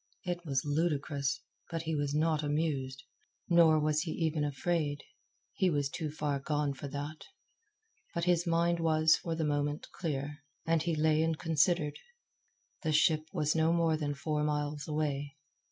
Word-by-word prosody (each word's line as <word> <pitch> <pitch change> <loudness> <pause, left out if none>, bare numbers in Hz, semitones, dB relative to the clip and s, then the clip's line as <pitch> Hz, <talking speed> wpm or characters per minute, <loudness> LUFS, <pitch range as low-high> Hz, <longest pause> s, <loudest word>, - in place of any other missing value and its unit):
It 175 -1 -3
was 135 -1 0
ludicrous, 145 -2 0 0.3
but 165 -1 -3
he 160 0 -2
was 145 -1 -1
not 155 0 +2
amused. 145 -3 -1 0.5
Nor 165 -2 +6
was 155 0 +1
he 165 - -4
even 160 -3 0
afraid. 145 0 -1 0.5
He 190 - +2
was 145 -4 0
too 155 +1 -4
far 145 -2 -2
gone 145 0 -1
for 140 +1 -7
that. 145 +3 -6 0.9
But 170 - -1
his 175 -1 +2
mind 170 +1 +2
was 160 -1 +4
for 165 -1 -3
the 160 -1 -1
moment 145 0 -1
clear, 145 -2 -3 0.3
and 165 -1 +2
he 165 0 0
lay 155 0 +3
and 160 -1 +1
considered. 160 -1 +1 0.8
The 160 - 0
ship 155 0 +3
was 150 0 +1
no 160 0 +3
more 165 -2 +3
than 145 -2 -2
four 150 +1 -1
miles 150 0 -1
away. 145 -2 -2
155 Hz, 160 wpm, -32 LUFS, 145-165 Hz, 0.9 s, Nor